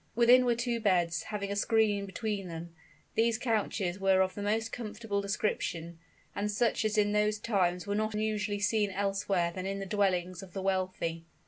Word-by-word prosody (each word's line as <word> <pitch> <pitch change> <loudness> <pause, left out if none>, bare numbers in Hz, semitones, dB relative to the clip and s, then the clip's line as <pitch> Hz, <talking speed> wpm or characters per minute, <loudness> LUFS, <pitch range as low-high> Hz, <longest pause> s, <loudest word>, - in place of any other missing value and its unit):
Within 245 +2 +6
were 240 -1 +3
two 235 0 -1
beds, 175 -6 +2
having 200 -2 -4
a - - -1
screen 205 -1 +2
between 200 0 -3
them. 165 0 -7 0.4
These 230 0 +2
couches 210 -6 -1
were 190 -1 +4
of 190 0 +1
the 205 - -6
most 220 +2 0
comfortable 215 -2 -3
description, 170 -5 -2 0.4
and 205 +1 -1
such 225 +2 +1
as 215 0 0
in 205 -1 +3
those 210 0 +2
times 180 -5 0
were 200 - -2
not 215 +1 -1
usually 210 -1 -1
seen 210 -1 +2
elsewhere 195 -2 0
than 185 +1 -4
in 195 0 -2
the 195 - -4
dwellings 185 -3 0
of 190 -2 -12
the 195 - -3
wealthy. 185 -3 -1
200 Hz, 185 wpm, -31 LUFS, 185-215 Hz, 0.4 s, Within